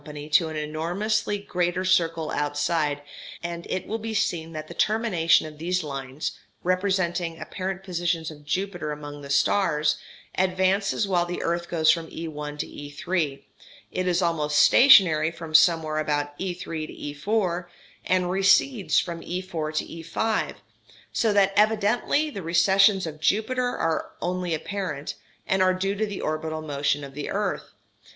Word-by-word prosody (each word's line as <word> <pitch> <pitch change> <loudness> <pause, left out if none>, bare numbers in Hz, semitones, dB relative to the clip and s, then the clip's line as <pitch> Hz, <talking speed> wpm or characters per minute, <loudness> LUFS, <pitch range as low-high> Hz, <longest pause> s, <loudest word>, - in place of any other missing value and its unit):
to 160 +1 +4
an 155 - -6
enormously 175 +8 -1
greater 180 -2 -1
circle 165 -4 +2
outside, 145 0 0 0.4
and 170 0 -5
it 185 - -2
will 225 +2 -3
be 220 0 -4
seen 170 -6 -1
that 155 -1 -6
the 170 - -9
termination 200 -7 +2
of 150 -1 -10
these 180 +2 -1
lines, 135 0 -4 0.3
representing 180 -2 0
apparent 190 0 -5
positions 170 -3 -1
of 150 -1 -13
Jupiter 175 0 -2
among 145 -1 -7
the 140 - -9
stars, 150 -1 +2 0.4
advances 190 +2 +1
while 175 -2 +1
the 175 - -4
earth 170 0 -1
goes 160 -2 +4
from 165 -1 -1
E_1 150 -2 -6
to - - -4
E_3; 145 0 -3 0.5
is 180 0 0
almost 150 -3 0
stationary 170 - +7
from 165 -1 -9
somewhere 155 -1 +4
about 145 -1 -1
E_3 175 -4 -4
to 145 0 -8
E_4; 180 -5 +1 0.4
and 180 -1 +1
recedes 195 +4 +3
from 170 -2 -4
E_4 170 -4 -4
to - - 0
E_5; 170 +7 -2 0.6
so 225 - +2
that 195 -1 +3
evidently 220 +8 +2
the 200 - -6
recessions 190 +3 +4
of 155 -1 -7
Jupiter 245 +7 +1
are 165 -1 -1
only 180 -1 -1
apparent, 160 -4 -4 0.3
and 190 0 +1
are 185 0 +4
due 195 +2 -1
to 215 +2 -1
the 200 -2 -5
orbital 155 0 -3
motion 145 -1 -1
of 135 -1 -8
the 145 +1 -5
earth. - - -2
170 Hz, 145 wpm, -25 LUFS, 155-190 Hz, 0.6 s, stationary